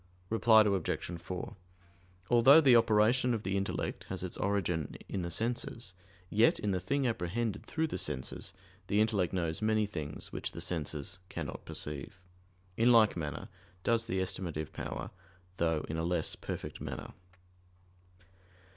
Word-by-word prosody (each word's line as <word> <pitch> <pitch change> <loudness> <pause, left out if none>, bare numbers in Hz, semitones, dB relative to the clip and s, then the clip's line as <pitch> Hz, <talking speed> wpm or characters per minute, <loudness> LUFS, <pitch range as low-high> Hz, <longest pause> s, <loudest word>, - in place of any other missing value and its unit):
Reply 110 -1 +6
Obj. 95 -4 -1
4: 90 +1 -5 0.8
Although 125 +6 +8
the 135 -6 +6
operation 115 +2 +4
of 110 - -5
the 95 +1 -1
intellect 100 0 -2
has - - -5
its - - -4
origin 90 -6 -1
in 95 - -3
the 85 - -3
senses: 115 -1 -2 0.3
yet, 110 +5 +4
in 105 - -1
the 95 - 0
thing 140 +7 0
apprehended 110 0 -2
through 160 0 0
the 160 - -3
senses, 70 -4 -3 0.4
the 105 - +2
intellect 105 -5 +2
knows 85 -2 -1
many 110 0 +2
things 80 -7 -5
which - - -3
the - - -6
senses 80 0 -3
cannot - - -6
perceive. 75 +5 -5 0.6
In 120 +2 +5
like 115 -3 +6
manner 75 -4 -4 0.4
does 115 0 +2
the 95 -5 -1
estimative 85 -4 -4
power, - - -5 0.5
though 80 -2 +1
in 80 - -3
a 80 - -1
less 85 -1 +1
perfect - - -6
manner. - - -6
95 Hz, 145 wpm, -32 LUFS, 85-115 Hz, 0.8 s, Although